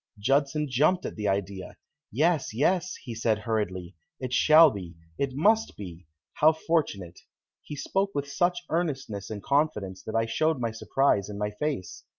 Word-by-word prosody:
Judson 140 +6 +1
jumped 150 +8 +2
at - - -5
the 105 -2 -3
idea. 95 -1 -3 0.3
"Yes, 155 -1 +1
yes," 180 +7 +1
he 120 - -8
said 110 -1 +1
hurriedly, 100 -5 -3 0.2
"it 125 -1 -4
shall 155 +3 +7
be 90 -5 -8 0.2
it 135 -2 -1
must 215 +9 +2
be. 90 -4 -9 0.3
How 155 +2 +5
fortunate!" 145 - -2 0.4
He 150 - -8
spoke 195 +7 -1
with 145 0 -2
such 175 +5 0
earnestness 135 - -2
and 105 -2 -6
confidence 140 -11 0
that 110 - -5
I 115 0 +2
showed 155 +6 0
my 115 -2 -1
surprise 110 -2 +1
in 100 - -6
my 105 0 -2
face. 125 - -4
130 Hz, 160 wpm, -27 LUFS, 105-155 Hz, 0.4 s, shall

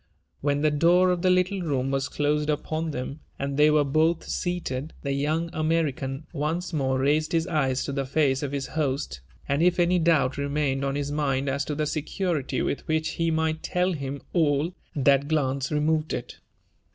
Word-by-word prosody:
When 145 0 0
the 155 0 +3
door 175 +5 +4
of 180 -1 -1
the 185 - +3
little 185 +1 +2
room 135 -5 -1
was 135 +1 -1
closed 150 +1 0
upon 155 +2 -1
them, 140 +1 -5 0.2
and 140 0 -3
they 150 +1 +5
were 150 -1 +4
both 155 +4 +2
seated, 160 -5 -3
the 140 - -1
young 155 +4 -1
American 155 -3 -1
once 165 +4 -2
more 130 -3 +1
raised 150 +4 +1
his 165 -1 +2
eyes 140 -7 0
to - - -3
the 135 -1 -2
face 135 -2 +2
of 145 -2 -3
his 140 -1 -2
host; 135 - -2 0.3
and 140 +2 +1
if 180 +1 +3
any 175 +1 +3
doubt 155 -5 +2
remained 140 -1 0
on 135 0 -1
his 145 0 -2
mind 140 -2 0
as 140 +1 0
to 150 - -3
the 155 +1 0
security 155 -2 -2
with - - -3
which 160 0 0
he 165 0 -1
might 160 0 0
tell 180 +1 0
him 140 -2 -5
all, 155 0 +2 0.2
that 140 0 +3
glance 140 -4 0
remoyed 155 +1 +1
it. 120 - -6
150 Hz, 190 wpm, -26 LUFS, 140-160 Hz, 0.3 s, they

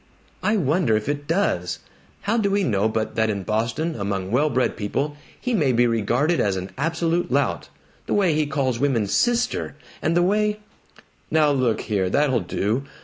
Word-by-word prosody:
"I 215 +1 +2
wonder 150 - +2
if 110 - -5
it 145 0 -3
does? 120 - 0 0.4
How 225 +4 0
do 200 -2 +1
we 200 0 +1
know 110 - +1
but 110 0 -2
that 110 0 +1
in 100 -2 -2
Boston, 115 - -1
among 100 -4 -3
well 145 +6 +3
bred 130 -2 0
people, 140 +8 -2 0.2
he 250 - -2
may 150 - +2
be 120 0 +3
regarded 120 +8 +1
as 100 -2 +1
an 95 0 -5
absolute 165 +4 -1
lout? - - 0 0.4
The - - 0
way 190 -5 +3
he 150 -1 +1
calls 135 -5 -1
women 130 -7 +1
'Sister,' 240 - 0 0.3
and 165 +2 +1
the 175 - +4
way 210 +2 +1 0.4
" - - -25 0.3
"Now 155 -2 +3
look 130 -5 +1
here! 95 -3 -1
That'll 135 +1 +2
do! 110 +7 -1
140 Hz, 185 wpm, -23 LUFS, 110-170 Hz, 0.4 s, the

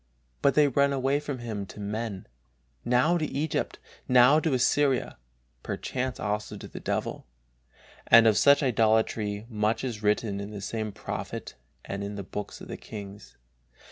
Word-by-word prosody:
But 140 - +3
they 150 -1 +6
run 140 +1 +2
away 135 +1 +1
from 145 -2 -5
Him 110 -5 -5
to 105 - -11
men, 105 -1 -4 0.6
now 130 +9 +3
to 155 - 0
Egypt, 150 +1 -2 0.3
now 125 +4 +6
to 155 -4 +1
Assyria, 135 - +1 0.4
perchance 130 -1 -3
also 105 0 -3
to - - -9
the - - -9
devil; - - -3 0.8
and 115 0 +8
of 110 -2 +5
such 140 +4 +5
idolatry 110 -3 +1
much 110 0 0
is 120 -5 -4
written 105 -1 0
in 100 +1 -5
the 105 -1 -7
same 110 +1 -3
Prophet - - -6 0.3
and 100 0 -4
in 100 +1 -5
the 100 - -5
Books 105 +2 -6
of - - -9
the - - -6
Kings. 100 -2 -10
115 Hz, 160 wpm, -27 LUFS, 105-135 Hz, 0.8 s, and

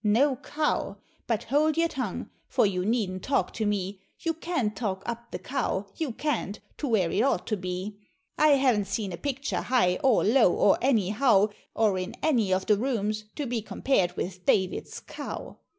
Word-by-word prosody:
No 250 +7 +3
Cow 300 +3 -1 0.3
but 230 -1 0
hold 300 +5 +2
your 335 0 +4
tongue 255 - -4 0.2
for - - +3
you 185 -3 0
needn't 200 -4 0
talk 275 - 0
to 220 -2 -1
me 195 -1 -2 0.2
You 330 -1 0
can't 315 - -2
talk 190 -3 -3
up 235 0 -5
the - - -4
Cow, 250 -7 -2
you 315 -5 -2
can't, 230 -6 -2 0.2
to 295 - -3
where 195 -9 +2
it - - +1
ought 235 -8 +1
to 215 - 0
be 185 +2 -5 0.4
I 305 - +4
haven't 250 -7 +2
seen 195 -1 -2
a - - -5
picture 280 +2 -2
high 180 -8 +2
or 260 -5 +4
low, 225 -3 +5
or 200 - +4
anyhow, 215 -3 +3 0.3
Or 210 -4 +2
in 185 +2 -5
any 235 -11 +2
of 185 0 +1
the 210 - +4
rooms, 215 -3 -1
to 295 - -3
be 240 -2 -2
compared 190 -5 0
with 180 0 -4
David's 185 0 0
Cow! - - -7
220 Hz, 180 wpm, -27 LUFS, 195-270 Hz, 0.4 s, low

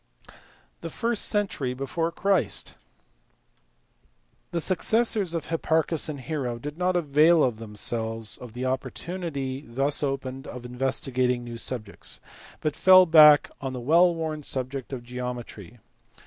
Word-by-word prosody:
The 165 - -5
first 230 +5 -1
century 160 -11 -1
before 165 +6 -2
Christ. 180 - 0 1.8
The 170 - -2
successors 200 +1 +1
of 160 -2 -3
Hipparchus 160 -1 0
and 145 -3 -5
Hero 130 -5 -3
did 145 +5 -7
not 180 +1 0
avail 155 -2 +4
them 110 -2 -11
selves 115 0 -1
of 125 -3 -11
the 125 +2 -4
opportunity 135 +1 -4
thus 135 +3 0
opened 135 -2 -3
of 125 0 -8
investigating 125 0 -1
new 120 -1 -7
subjects, 110 -5 -4 0.4
but 155 - -1
fell 185 0 +7
back 155 -3 +7
on 135 -2 -4
the 125 - -5
well 170 +7 +4
worn 160 -2 -3
subject 130 -1 -4
of 130 -3 -5
geometry. 120 -4 -7
135 Hz, 130 wpm, -26 LUFS, 125-165 Hz, 1.8 s, fell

